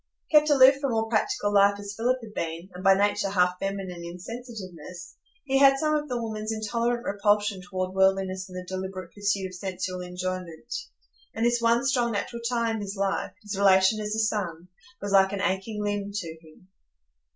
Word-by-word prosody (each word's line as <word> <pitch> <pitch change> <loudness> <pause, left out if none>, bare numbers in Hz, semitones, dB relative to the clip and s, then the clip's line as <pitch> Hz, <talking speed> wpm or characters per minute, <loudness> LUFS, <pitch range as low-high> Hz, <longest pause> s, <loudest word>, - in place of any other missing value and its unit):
Kept 300 -1 +6
aloof 270 -1 +7
from 270 -5 0
all 225 0 0
practical 215 -2 0
life 200 0 +5
as 205 0 -7
Philip 245 +4 +1
had 215 -2 -10
been, 165 +2 -4
and 180 +1 -9
by 195 0 +6
nature 205 0 +1
half 180 -2 +2
feminine 195 -3 -4
in 170 +1 -7
sensitiveness, 185 -6 -9 0.3
he 270 -1 +1
had 275 -1 +7
some 305 +2 +1
of 300 -1 -1
the 245 -1 -1
woman's 220 -1 -4
intolerant 235 +2 -1
repulsion 205 -1 +1
toward 185 0 -4
worldliness 190 0 +1
and 185 - -8
the 180 - -6
deliberate 185 -1 -6
pursuit 205 -1 -1
of 185 - -7
sensual 185 0 -4
enjoyment; 180 +1 -5 0.6
and 225 - 0
this 240 0 +2
one 235 +2 +3
strong 245 -3 +1
natural 235 +3 -3
tie 235 -2 0
in 220 -1 -3
his 200 0 -5
life,—his 200 +1 -3
relation 190 +1 +4
as 210 0 -2
a - - -1
son,—was 200 +2 -4
like 195 0 +5
an 200 - -2
aching 200 +2 -1
limb 205 -1 -2
to 170 -6 -5
him. 155 +4 -19
200 Hz, 185 wpm, -26 LUFS, 185-225 Hz, 0.6 s, aloof